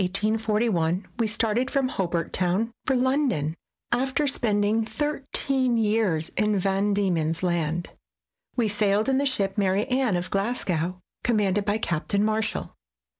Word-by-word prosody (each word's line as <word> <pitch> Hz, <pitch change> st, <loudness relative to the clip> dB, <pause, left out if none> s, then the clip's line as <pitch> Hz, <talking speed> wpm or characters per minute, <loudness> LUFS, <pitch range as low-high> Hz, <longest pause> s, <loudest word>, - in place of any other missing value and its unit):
In 180 Hz, -, -1 dB
January, 210 Hz, +3 st, +2 dB, 0.3 s
1841, 175 Hz, -2 st, 0 dB
we 230 Hz, -, +2 dB
started 225 Hz, +3 st, +1 dB
from 275 Hz, -2 st, 0 dB
Hobart 170 Hz, -7 st, -2 dB
Town 185 Hz, +6 st, +1 dB, 0.2 s
for 265 Hz, -, +3 dB
London, 250 Hz, -, +1 dB, 0.4 s
after 265 Hz, +4 st, +1 dB
spending 220 Hz, -4 st, +1 dB
thirteen 270 Hz, -2 st, 0 dB
years 210 Hz, -7 st, +1 dB
in 210 Hz, -1 st, +1 dB
Van 195 Hz, +2 st, +1 dB
Diemen's 165 Hz, -4 st, 0 dB
Land. 170 Hz, -1 st, -1 dB, 0.6 s
We 235 Hz, -3 st, +2 dB
sailed 210 Hz, +1 st, +2 dB
in 265 Hz, 0 st, +2 dB
the 280 Hz, -, +1 dB
ship 200 Hz, -5 st, 0 dB
Mary 195 Hz, +1 st, +2 dB
Anne, 255 Hz, -6 st, +1 dB
of 175 Hz, +1 st, -5 dB
Glasgow, 185 Hz, -5 st, -1 dB, 0.2 s
commanded 205 Hz, -4 st, +1 dB
by 205 Hz, +1 st, +1 dB
Captain 200 Hz, +2 st, 0 dB
Marshall. 220 Hz, 0 st, -1 dB
210 Hz, 140 wpm, -25 LUFS, 185-240 Hz, 0.6 s, for